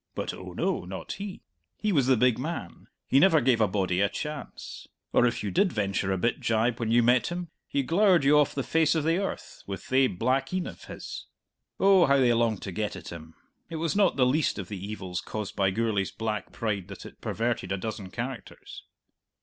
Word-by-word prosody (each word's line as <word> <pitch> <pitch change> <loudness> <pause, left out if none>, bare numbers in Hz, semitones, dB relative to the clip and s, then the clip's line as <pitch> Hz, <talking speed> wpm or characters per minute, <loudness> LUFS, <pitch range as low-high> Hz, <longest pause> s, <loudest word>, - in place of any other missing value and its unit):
But, - - -3
oh - - -9
no, - - -1
not - - -7
he; 200 -1 -7 0.3
he 210 - 0
was 140 -8 +2
the 130 -2 +4
big 125 0 +3
man; 135 - -5 0.2
he 135 - +4
never 165 -1 +6
gave 120 -3 +2
a 110 - +5
body 95 -2 0
a 100 - +3
chance! 150 -1 -7 0.3
Or 125 - +5
if 120 - -2
you 100 - -2
did 190 - +2
venture 100 -2 -1
a 95 - +1
bit 115 +6 0
jibe 115 +1 +1
when 115 -2 -1
you 120 +1 +4
met 125 +1 +4
him, 175 -1 -4 0.2
he 140 - 0
glowered 175 +2 +4
you 140 +2 +5
off 145 - +1
the 135 - -1
face 160 +2 +2
of 160 - +1
the 165 +3 +2
earth 195 - -5
with 95 -1 -5
thae 130 0 +3
black 130 +6 0
een 185 - -1
of - - -9
his. - - -8 0.5
Oh, 195 -4 +6
how 140 0 +4
they 125 -3 +4
longed 115 -3 +1
to 95 - -5
get 105 +3 -3
at - - -9
him! 80 -1 -10 0.3
It 165 - -6
was 160 +1 -1
not 200 -3 +3
the 130 - +4
least 145 +4 +1
of 95 -4 -6
the 100 -3 -6
evils 95 -4 -4
caused 105 -2 -5
by 95 -1 +2
Gourlay's 105 -1 0
black 110 -3 -4
pride 100 -5 -2
that 100 -1 -10
it - - -13
perverted 115 -5 -2
a 95 - 0
dozen 105 -1 -5
characters. 120 +5 -7
120 Hz, 220 wpm, -27 LUFS, 100-150 Hz, 0.5 s, never